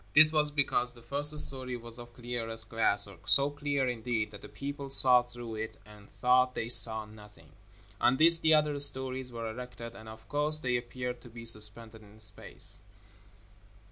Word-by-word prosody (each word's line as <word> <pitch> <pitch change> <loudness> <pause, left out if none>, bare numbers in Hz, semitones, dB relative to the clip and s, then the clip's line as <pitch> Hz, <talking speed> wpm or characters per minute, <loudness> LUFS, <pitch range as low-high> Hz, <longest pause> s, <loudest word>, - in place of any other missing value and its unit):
This 155 +1 +6
was 150 -1 -1
because 135 -4 -2
the 120 -1 -17
first 145 +3 +1
story 130 -4 -2
was 115 0 -5
of 120 0 -14
clearest 115 -3 -1
glass, 105 -3 +1 0.2
so 140 +1 +2
clear, 145 -2 -4
indeed, 115 -2 -5
that 100 - -14
the - - -14
people 140 0 -9
saw 130 -2 +7
through 120 -2 -12
it 110 +1 -8
and 105 -1 -18
thought 125 0 0
they 115 - -6
saw 110 -2 +6
nothing. 105 -1 -18 0.5
On 125 - +1
this 165 +2 +6
the 160 -1 +2
other 150 -1 -1
stories 130 -2 +2
were 115 -1 -8
erected, 115 0 -10
and, 110 0 -14
of 110 0 -15
course, 150 +1 +1
they 125 -4 -3
appeared 125 0 -7
to 120 - -16
be 115 0 -13
suspended 110 0 +2
in 105 +1 -20
space. 105 -2 -3
125 Hz, 175 wpm, -28 LUFS, 115-140 Hz, 0.5 s, saw